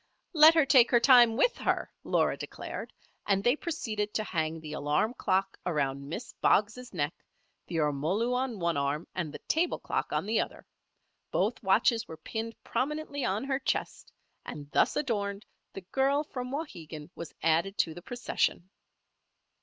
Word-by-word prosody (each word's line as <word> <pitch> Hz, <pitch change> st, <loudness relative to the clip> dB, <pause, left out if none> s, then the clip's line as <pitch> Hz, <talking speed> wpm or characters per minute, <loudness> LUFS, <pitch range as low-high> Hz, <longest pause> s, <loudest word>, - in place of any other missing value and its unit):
"Let 315 Hz, 0 st, +8 dB
her 320 Hz, -3 st, +5 dB
take 255 Hz, -3 st, +6 dB
her 240 Hz, -, +5 dB
time 240 Hz, -2 st, +6 dB
with -, -, +3 dB
her," -, -, -1 dB
Laura -, -, +2 dB
declared; -, -, -7 dB, 0.4 s
and 195 Hz, -1 st, +2 dB
they 245 Hz, +4 st, +4 dB
proceeded 215 Hz, -11 st, -3 dB
to 215 Hz, -, +1 dB
hang 160 Hz, -4 st, -2 dB
the 155 Hz, -1 st, -8 dB
alarm 150 Hz, +10 st, 0 dB
clock 190 Hz, -4 st, 0 dB
around 140 Hz, -4 st, -1 dB
Miss 225 Hz, +9 st, -6 dB
Boggs' 225 Hz, +5 st, +2 dB
neck, 150 Hz, -4 st, -1 dB, 0.5 s
the 175 Hz, -, -6 dB
ormolu 160 Hz, -, 0 dB
on 250 Hz, -2 st, -1 dB
one 170 Hz, -4 st, 0 dB
arm 140 Hz, +3 st, -1 dB
and 170 Hz, -5 st, -3 dB
the -, -, -7 dB
table 335 Hz, +3 st, +1 dB
clock -, -, -3 dB
on -, -, 0 dB
the 220 Hz, +2 st, +1 dB
other. -, -, -4 dB, 0.6 s
Both -, -, 0 dB
watches 230 Hz, -2 st, +3 dB
were 160 Hz, -, -9 dB
pinned 225 Hz, +7 st, -5 dB
prominently 285 Hz, 0 st, -2 dB
on 205 Hz, +1 st, -1 dB
her 270 Hz, 0 st, -1 dB
chest, 265 Hz, -, -3 dB, 0.3 s
and 145 Hz, -1 st, -8 dB
thus -, -, +3 dB
adorned, 205 Hz, -6 st, -2 dB, 0.3 s
the 195 Hz, -, -7 dB
girl 270 Hz, +9 st, +1 dB
from 250 Hz, -4 st, -6 dB
Wauhegan 165 Hz, -, -6 dB
was 170 Hz, -, -9 dB
added 165 Hz, +5 st, +2 dB
to 160 Hz, -, +1 dB
the 175 Hz, -, -10 dB
procession. 195 Hz, -4 st, -2 dB
210 Hz, 160 wpm, -29 LUFS, 160-250 Hz, 0.6 s, Let